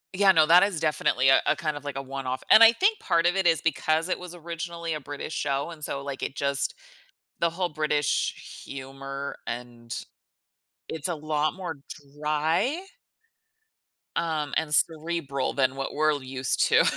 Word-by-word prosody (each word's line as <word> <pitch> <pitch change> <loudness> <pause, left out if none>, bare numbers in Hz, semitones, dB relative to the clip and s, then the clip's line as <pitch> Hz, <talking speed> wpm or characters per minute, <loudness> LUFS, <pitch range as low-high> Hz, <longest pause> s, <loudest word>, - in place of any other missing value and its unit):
Yeah, 195 0 +6
no, 160 -4 +5
that 170 +3 +7
is 195 -5 0
definitely 150 -4 +2
a 135 - +6
a - - +4
kind 155 -5 -2
of 145 - -7
like 145 -1 -5
a 135 - -2
one 135 0 -6
off, 130 +1 -3
and 220 - +9
I 225 - +10
think 395 - +2
part 170 -2 +1
of 175 +1 +3
it 190 -2 +2
is 165 -2 +3
because 160 +1 +1
it - - -1
was 180 -1 -9
originally 170 0 -5
a 155 - -3
British 145 +2 -7
show, 140 +2 -1
and 155 -2 -11
so, 140 -1 -3
like, 140 -1 -5
it 135 - -3
just 140 0 -1 0.7
the 170 - +3
whole 180 +2 -1
British 150 -2 -1
humor, 135 +1 -6
and 120 -1 -7 1.0
It's 160 0 -4
a 175 - -1
lot 155 0 0
more 175 -5 -6 0.4
dry? 160 - +1 1.4
Um, 155 -3 -1
and 155 -1 -1
cerebral 160 -4 0
than 130 -1 +1
what 135 0 -4
we're 155 +1 +3
used 130 -1 0
to - - +5
155 Hz, 175 wpm, -26 LUFS, 140-170 Hz, 1.4 s, I